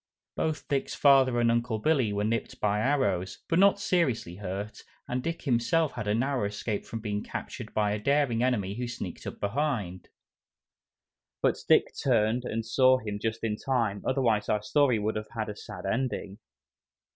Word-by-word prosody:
Both 155 -1 -2
Dick's 140 -1 -1
father 135 -4 +5
and 115 -1 +3
Uncle 120 -1 0
Billy 130 -2 +2
were 100 0 -1
"nipped" 115 +1 -2
by 105 0 +1
arrows, 105 -8 0
but 165 - +2
not 200 +1 +5
seriously 120 - 0
hurt, 100 +2 -5 0.3
and 125 +1 -2
Dick 165 +4 -4
himself 140 +5 +2
had 105 - -5
a 105 - +2
narrow 130 -1 0
escape 105 +1 -3
from 115 - -5
being 105 -2 -2
captured - - -6
by 105 -1 +2
a 105 - -1
daring 140 -1 +2
enemy 110 -7 0
who 125 - -2
sneaked 120 - -6
up - - -7
behind. 105 -5 -2 1.3
But - - +2
Dick - - +4
turned 120 -1 +2
and 115 -1 -3
saw 130 +3 +4
him 105 -4 -5
just 115 0 -2
in 105 -2 -1
time, 115 -7 -1
otherwise 115 -6 +1
our 105 -1 +1
story 140 0 +3
would 105 +1 -1
have 105 0 -6
had 110 -1 -2
a 105 - -5
sad - - -9
ending. 105 -2 -2
115 Hz, 175 wpm, -28 LUFS, 105-130 Hz, 1.3 s, father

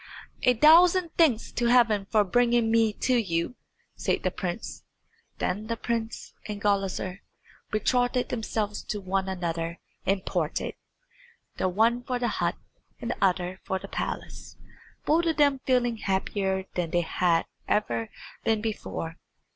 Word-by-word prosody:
"A 250 - +4
thousand 335 +6 +6
thanks 275 -10 +3
to 240 - 0
Heaven 230 -5 +4
for 215 -2 +4
bringing 235 +2 +2
me 225 -1 +4
to 250 +4 +1
you," 170 +1 -1 0.4
said - - -1
the - - +1
prince. - - -5 0.5
Then 205 +4 -2
the 230 0 -2
prince 230 0 -3
and 210 -1 -4
Gulizar 195 -2 -1 0.5
betrothed 245 +3 +1
themselves 215 -3 -2
to 210 - -3
one 190 0 -1
another 170 -2 -3 0.3
and 195 0 0
parted, 165 -4 -1 0.8
the 185 - +1
one 225 +6 +2
for 250 0 -2
the 245 -1 0
hut - - +1 0.4
and 240 -1 -3
the 215 - -3
other 185 0 +1
for 190 - -1
the - - -8
palace, - - -5 0.5
both 335 +3 +3
of 325 - +1
them 285 -2 +4
feeling 245 -3 +2
happier 190 -1 -1
than 175 -2 -1
they 175 +2 +2
had 170 0 +1 0.2
ever 115 - 0 0.3
been 225 -1 +2
before. 210 -6 -4
215 Hz, 145 wpm, -27 LUFS, 190-245 Hz, 0.8 s, thousand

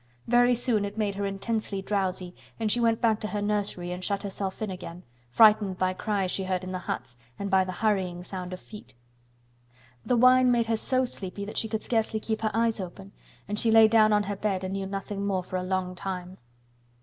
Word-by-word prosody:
Very 245 +1 +4
soon 230 -3 +1
it 200 +1 -5
made 210 -2 0
her 200 0 -2
intensely 200 +1 -2
drowsy, 185 -3 -1 0.3
and 220 -2 0
she 240 - +1
went 230 -1 +2
back 220 -3 +3
to 215 - -3
her 210 - -3
nursery 205 -4 -1
and 180 +1 -5
shut 200 +1 -1
herself 195 -1 -4
in 215 -3 -3
again, 180 -1 -8 0.3
frightened 210 - +5
by 185 0 +1
cries 195 -1 -1
she 190 - -2
heard 185 -1 -1
in 185 - -5
the 185 - -3
huts 125 -7 -5 0.2
and 200 -1 -4
by 190 0 +5
the 185 - -4
hurrying 185 -4 0
sound 185 -1 -6
of 185 - -6
feet. 210 - -13 1.1
The 250 - +1
wine 255 +1 +6
made 235 -1 +2
her 225 0 0
so 255 +3 +1
sleepy 200 -4 -6
that 210 - -3
she 225 - -2
could 220 0 -3
scarcely 225 -2 0
keep 220 0 -3
her 220 - +1
eyes 225 0 +1
open 190 +1 -8 0.4
and 210 +1 -1
she 230 - +2
lay 225 0 +8
down 215 -1 +5
on 210 0 +3
her 205 0 -3
bed 195 -2 -1
and 185 0 -3
knew 195 0 -3
nothing 195 +1 -4
more 195 -2 0
for 185 - -4
a 180 - -2
long 185 0 -1
time. 185 0 -6
200 Hz, 220 wpm, -27 LUFS, 185-220 Hz, 1.1 s, lay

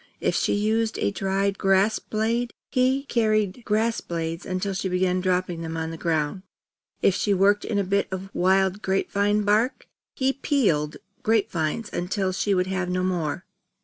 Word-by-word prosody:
If - - 0
she - - +1
used 220 +2 0
a 100 - 0
dried 195 - -1
grass 195 +2 +3
blade, 230 +3 -1 0.2
he 260 +2 +2
carried 215 -4 0
grass 220 +2 +1
blades 165 0 -4
until 185 +2 -2
she 190 0 -2
began 180 0 +1
dropping 180 -2 0
them 165 0 -4
on 160 0 -3
the - - -6
ground. 160 +1 -1 0.6
If 195 - +5
she 200 +1 +1
worked 200 +2 +3
in 210 - -1
a 200 - +2
bit 200 +1 +1
of 190 +1 -6
wild 190 +2 +2
grape 190 -1 -1
vine 205 +1 +2
bark, 215 +6 +1 0.3
he 265 0 +1
peeled 190 - +1 0.2
grape 225 -4 +2
vines 170 +7 -2
until 190 +2 -1
she 195 +2 0
would 180 0 +2
have 185 -1 -2
no 180 0 0
more. 180 -2 -2
195 Hz, 175 wpm, -25 LUFS, 180-215 Hz, 0.6 s, If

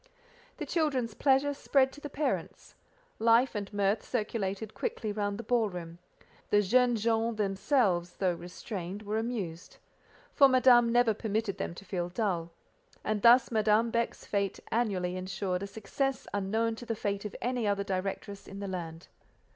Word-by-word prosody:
The - - -4
children's 270 -9 0
pleasure 275 +3 +3
spread 270 -1 +2
to 290 - -13
the 295 - -6
parents; 290 +2 -3 0.5
life 230 +3 +4
and 205 -2 -4
mirth 205 +1 +1
circulated 215 -3 -3
quickly 215 - -3
round 205 -1 -2
the 235 - -6
ball 230 -1 +2
room; 170 -2 -8 0.5
the 205 0 +4
"jeunes 240 +1 +3
gens" 225 0 +1
themselves, 195 -3 +1
though 185 -2 +1
restrained, 180 +3 -6
were 210 +1 -1
amused: 200 -8 -5 0.6
for 275 - +7
Madame 250 -2 +6
never 240 -2 +4
permitted 215 -1 -2
them 170 - -3
to 195 - -11
feel 180 -2 -3
dull—and 200 - -4
thus 240 +2 +6
Madame 220 +1 +3
Beck's 235 0 -1
fête 200 -2 -1
annually 190 -6 0
ensured 185 0 -3
a 200 - -4
success 225 +7 -2
unknown 220 +3 0
to 240 - -8
the 225 - -1
fête 200 -1 -2
of 210 - -6
any 245 -3 -1
other 200 0 +1
directress 195 +1 -4
in 195 - -8
the 200 - -4
land. 170 -3 -6
210 Hz, 155 wpm, -30 LUFS, 195-235 Hz, 0.6 s, for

